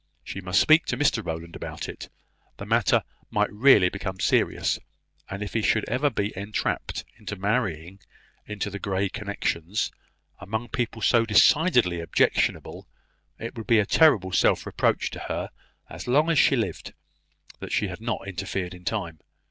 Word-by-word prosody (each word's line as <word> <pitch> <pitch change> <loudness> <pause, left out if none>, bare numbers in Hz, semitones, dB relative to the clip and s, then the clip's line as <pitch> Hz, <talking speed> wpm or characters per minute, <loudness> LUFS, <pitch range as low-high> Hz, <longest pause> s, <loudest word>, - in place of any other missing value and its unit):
She 100 - -7
must 90 -1 +2
speak 155 +2 +5
to 125 - -1
Mr 135 -5 +1
Rowland 85 -1 -6
about - - -6
it; - - -8 0.5
the - - -7
matter - - +2 0.3
might 105 -2 0
really 105 -4 +6
become 95 0 -5
serious; - - +1 0.5
and 95 +2 -4
if 100 - -7
he 115 - +1
should 110 0 +1
ever 130 +6 +1
be 105 -4 -3
entrapped 100 +3 -3
into 105 - -6
marrying 95 -4 -2 0.5
into 105 -1 -4
the 100 - -6
Grey 95 0 -1
connections, 100 -2 -2 0.5
among 110 +4 -4
people 115 -2 -3
so 115 -1 +4
decidedly 115 - +4
objectionable, 85 - 0 0.5
it 115 - -7
would 115 -2 -7
be 115 - +5
a 105 - +3
terrible 105 - +4
self 90 - +2
reproach - - 0
to - - -7
her - - -3 0.4
as - - -9
long 150 +6 +3
as 160 - +3
she 135 - +5
lived, 115 -4 -3 0.7
that - - -7
she 105 - +1
had 90 +2 -8
not 115 -4 -3
interfered 95 -1 -4
in 90 0 -13
time. 90 -7 -3
105 Hz, 165 wpm, -25 LUFS, 95-115 Hz, 0.7 s, really